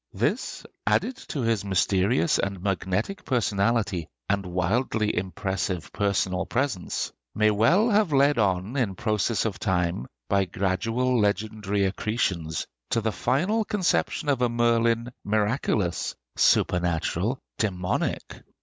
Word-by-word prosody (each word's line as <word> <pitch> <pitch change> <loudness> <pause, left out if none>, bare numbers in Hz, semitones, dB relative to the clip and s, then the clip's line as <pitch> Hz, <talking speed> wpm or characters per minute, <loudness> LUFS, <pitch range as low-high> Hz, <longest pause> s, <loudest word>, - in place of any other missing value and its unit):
This, - - -1 0.2
added 260 - +2
to 140 - -3
his 115 -3 +1
mysterious 100 - +2
and 100 -1 -2
magnetic 100 - -2
personality 105 -6 0 0.2
and 100 0 +1
wildly 105 +5 0
impressive 95 -1 -3
personal 95 -2 0
presence, 120 -8 -1 0.2
may 110 0 +4
well 155 - +4
have 205 -5 +3
led 140 -1 +4
on 95 +3 0
in 115 -8 0
process 110 +2 0
of 105 -2 -2
time, 90 - 0 0.2
by 100 -1 +2
gradual 115 +8 0
legendary 105 -1 0
accretions, 95 -5 -1 0.2
to 115 - +2
the 110 0 0
final 145 - +1
conception 185 -5 0
of 135 -3 +1
a 125 - +3
Merlin 115 0 +2
miraculous, 105 -4 0 0.2
supernatural, 90 +6 +2 0.2
dæmonic! 90 -4 -2
105 Hz, 115 wpm, -26 LUFS, 95-120 Hz, 0.2 s, may